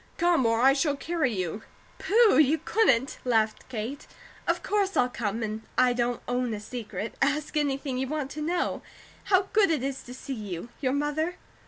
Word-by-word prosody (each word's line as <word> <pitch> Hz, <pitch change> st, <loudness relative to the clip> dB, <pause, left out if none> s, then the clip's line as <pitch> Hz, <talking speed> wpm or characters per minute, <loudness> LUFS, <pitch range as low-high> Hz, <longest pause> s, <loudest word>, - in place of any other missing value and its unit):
Come, 340 Hz, -7 st, +3 dB
or 225 Hz, 0 st, +2 dB
I 265 Hz, +3 st, +6 dB
shall 285 Hz, +1 st, +1 dB
carry 310 Hz, -2 st, -1 dB
you!" 185 Hz, 0 st, -3 dB, 0.4 s
"Pooh! 405 Hz, -, +5 dB
You 310 Hz, +1 st, +5 dB
couldn't!" 275 Hz, -, +2 dB
laughed 220 Hz, -3 st, 0 dB
Kate. 245 Hz, +3 st, -5 dB, 0.4 s
"Of -, -, 0 dB
course 400 Hz, -2 st, 0 dB
I'll 250 Hz, -, +4 dB
come! 225 Hz, -2 st, -3 dB
And 215 Hz, 0 st, -3 dB, 0.2 s
I 250 Hz, -1 st, +5 dB
don't 240 Hz, 0 st, -1 dB
own 245 Hz, -2 st, -1 dB
a -, -, -6 dB
secret. 220 Hz, 0 st, -6 dB
Ask 295 Hz, +3 st, 0 dB
anything 275 Hz, -3 st, -1 dB
you 265 Hz, -, -1 dB
want 295 Hz, -1 st, -3 dB
to 305 Hz, -, -6 dB
know. 345 Hz, +4 st, -1 dB, 0.4 s
How 380 Hz, -1 st, +3 dB
good 420 Hz, -3 st, +5 dB
it 305 Hz, -6 st, 0 dB
is 270 Hz, 0 st, -3 dB
to 250 Hz, -, -9 dB
see 270 Hz, -, -6 dB
you! 205 Hz, -3 st, -6 dB
Your 260 Hz, -2 st, +1 dB
mother 295 Hz, +4 st, -1 dB
270 Hz, 185 wpm, -27 LUFS, 235-310 Hz, 0.4 s, I